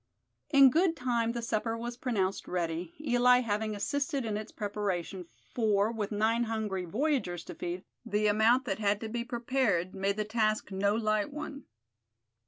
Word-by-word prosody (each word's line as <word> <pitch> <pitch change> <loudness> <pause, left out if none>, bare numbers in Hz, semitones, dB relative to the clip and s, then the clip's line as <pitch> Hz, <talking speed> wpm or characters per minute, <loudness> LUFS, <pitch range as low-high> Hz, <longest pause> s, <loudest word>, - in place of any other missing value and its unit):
In 275 -3 +7
good 335 +3 +3
time 240 -4 0
the 235 -1 -4
supper 225 0 -1
was 240 +1 -5
pronounced 205 -7 -1
ready, 170 -1 -3
Eli 250 -3 +4
having 215 -2 -1
assisted 280 +5 -1
in 215 -2 -2
its 215 +1 -5
preparation; 195 -4 -3 0.3
for, 215 -2 +2
with 215 -3 -3
nine 225 +3 +2
hungry 215 -5 -2
voyagers 215 - -1
to - - -8
feed, 175 +1 -5 0.2
the 215 -2 0
amount 220 +5 +4
that 245 - -2
had 205 -1 +1
to 225 - -4
be 235 +1 -2
prepared 235 -7 0
made 195 +1 -1
the 215 - -1
task 215 -1 0
no 200 +2 +1
light 215 +1 0
one. 285 -2 -7
220 Hz, 165 wpm, -30 LUFS, 200-245 Hz, 0.3 s, In